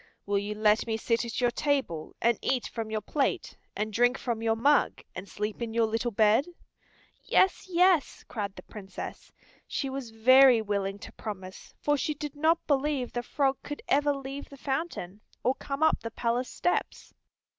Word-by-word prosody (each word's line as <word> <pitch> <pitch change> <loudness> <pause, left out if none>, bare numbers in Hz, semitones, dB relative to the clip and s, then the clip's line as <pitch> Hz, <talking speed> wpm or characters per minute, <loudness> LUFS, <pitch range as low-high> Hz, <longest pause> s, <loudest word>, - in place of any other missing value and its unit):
Will 200 0 +1
you 205 +1 -4
let 215 +1 +3
me 220 -1 0
sit 230 +1 0
at 235 - -4
your 245 -1 +2
table, 255 - -1
and 235 -2 +2
eat 260 -2 0
from 225 -2 -5
your 215 -1 -2
plate, 275 +7 -1 0.2
and 215 0 -2
drink 245 +4 +3
from 235 -3 -3
your 225 0 +2
mug, 280 +6 +2
and 185 +2 -8
sleep 210 +2 -4
in 230 -1 -4
your 230 -1 +4
little 225 +2 -1
bed?" 220 - +3 0.8
"Yes, 380 0 +2
yes," 360 -3 +3
cried 200 -3 -4
the - - -10
Princess. 195 -3 -9 0.4
She 270 -2 -2
was 265 -3 -5
very 255 +2 +6
willing 200 -2 -2
to 205 - -10
promise, 190 -3 -8
for 290 0 +1
she 300 +3 -1
did 295 0 -6
not 320 +3 +2
believe 280 -3 0
the 240 - -1
frog 270 +2 0
could 290 - -7
ever 290 +1 +3
leave 275 +1 -7
the 280 - -12
fountain, 265 - -4 0.2
or 255 - +3
come 275 +2 -4
up 315 - +4
the 230 - -5
palace 240 +2 -1
steps. 355 - -2
240 Hz, 180 wpm, -28 LUFS, 215-280 Hz, 0.8 s, very